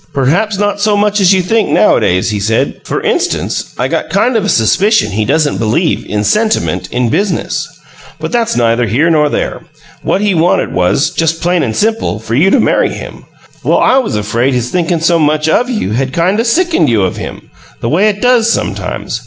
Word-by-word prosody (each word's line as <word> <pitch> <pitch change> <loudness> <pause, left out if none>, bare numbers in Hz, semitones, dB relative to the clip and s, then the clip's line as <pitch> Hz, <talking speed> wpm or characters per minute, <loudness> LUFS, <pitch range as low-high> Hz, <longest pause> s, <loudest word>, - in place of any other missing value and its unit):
"Perhaps 175 +11 +1
not 205 0 -1
so 210 0 +2
much 205 0 +1
as 185 -1 +4
you 190 -2 +2
think, 220 +4 0
nowadays," 95 - +2
he 105 - -2
said. 110 +3 -1
"For - - -3
instance, - - -1
I - - 0
got - - -3
kind 230 +6 +1
of 220 - +1
a 205 - -1
suspicion 185 - +2
he 105 +2 -1
doesn't 150 +4 0
believe 120 +10 0
in 105 0 -2
'sentiment 215 - 0
in 125 -1 0
business.' 200 - -1 0.5
But - - -5
that's 235 -2 0
neither 115 0 +1
here 145 +11 +1
nor 150 -2 +2
there. - - -3 0.4
What 195 - -1
he 205 -2 +1
wanted 170 +1 +1
was, 90 +10 +1
just 165 0 -1
plain 175 0 0
and 110 -4 -2
simple, 225 - -1
for 110 +1 -6
you 155 +10 +3
to 265 - +3
marry - - +2
him. - - -9 0.4
Well, - - +2
I 265 - +3
was 245 - -2
afraid 115 +5 0
his 125 0 -2
thinkin' 170 0 -1
so 170 0 +2
much 155 0 +1
OF 245 +10 +1
you 215 - -2
had 130 +3 -2
kind 180 +7 +1
o' - - +2
sickened 330 - +1
you 110 -4 +2
of 95 - -2
him - - -8 0.3
the - - -2
way 190 - +2
it 205 +2 -4
does 240 -2 +3
sometimes. - - -3
170 Hz, 205 wpm, -12 LUFS, -, 0.5 s, as